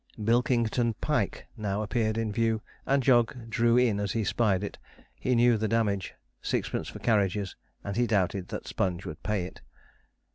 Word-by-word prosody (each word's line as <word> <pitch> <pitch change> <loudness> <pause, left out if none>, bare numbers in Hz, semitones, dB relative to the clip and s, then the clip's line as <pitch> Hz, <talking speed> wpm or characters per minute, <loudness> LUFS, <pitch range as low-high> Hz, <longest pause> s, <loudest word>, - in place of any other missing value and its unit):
Bilkington 115 0 +2
Pike - - -1
now 105 0 -2
appeared 110 0 0
in 115 -2 -1
view, 110 0 0 0.2
and 135 -1 +3
Jog 120 -1 +3
drew 120 +1 +3
in 120 -5 +3
as 100 -2 -1
he 115 - 0
spied 100 -3 +1
it. 100 - -5 0.3
He 125 - 0
knew 120 -1 +5
the 110 - 0
damage: 105 -4 0 0.3
sixpence - - -2
for - - -7
carriages, 100 -3 +1 0.3
and 100 - -4
he 120 +1 +2
doubted 95 -3 +1
that - - -6
Sponge 90 -1 -2
would 75 - -7
pay 100 -2 -1
it. 95 - -10
110 Hz, 170 wpm, -28 LUFS, 100-120 Hz, 0.3 s, knew